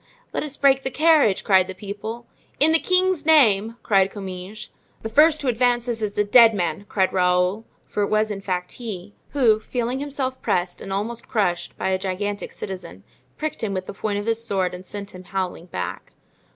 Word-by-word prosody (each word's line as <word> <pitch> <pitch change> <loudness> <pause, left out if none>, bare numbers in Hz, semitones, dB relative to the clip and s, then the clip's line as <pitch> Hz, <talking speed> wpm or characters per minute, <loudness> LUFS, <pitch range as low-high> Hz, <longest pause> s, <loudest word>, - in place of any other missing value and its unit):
"Let - - -1
us 290 -2 -6
break 270 -1 +4
the 265 - -2
carriage!" 300 - +3
cried 190 -2 +4
the 190 - -7
people. 210 +4 -7 0.3
"In 305 +3 +5
the 325 - +4
king's 370 -3 +2
name!" 230 -8 +4
cried 195 -3 +3
Comminges. 195 +1 -8 0.3
"The 225 - -3
first 300 +5 +4
who - - -2
advances 240 -1 +1
is 210 -1 -3
a 210 - +4
dead 225 +1 +6
man!" 175 +1 -2
cried 190 -2 +1
Raoul, 180 +3 +2 0.2
for 210 - -3
it 200 - +1
was 215 0 +1
in 195 -1 -5
fact 180 -2 -3
he, 210 -5 -7 0.2
who, 235 -7 +4
feeling 245 +3 -3
himself 270 -2 -3
pressed 180 0 -1
and 195 - -7
almost 220 +4 -3
crushed 180 -7 -1
by - - -1
a 190 0 0
gigantic 200 +2 -3
citizen, 95 - -7 0.3
pricked 310 -6 -4
him 200 -3 -1
with 185 0 -3
the - - -7
point 205 0 -2
of 205 - -3
his 230 0 0
sword 190 -5 -1
and 180 +1 -9
sent 200 +1 -7
him 185 0 -11
howling 185 -2 -4
back. 90 - -5
210 Hz, 195 wpm, -23 LUFS, 190-245 Hz, 0.3 s, dead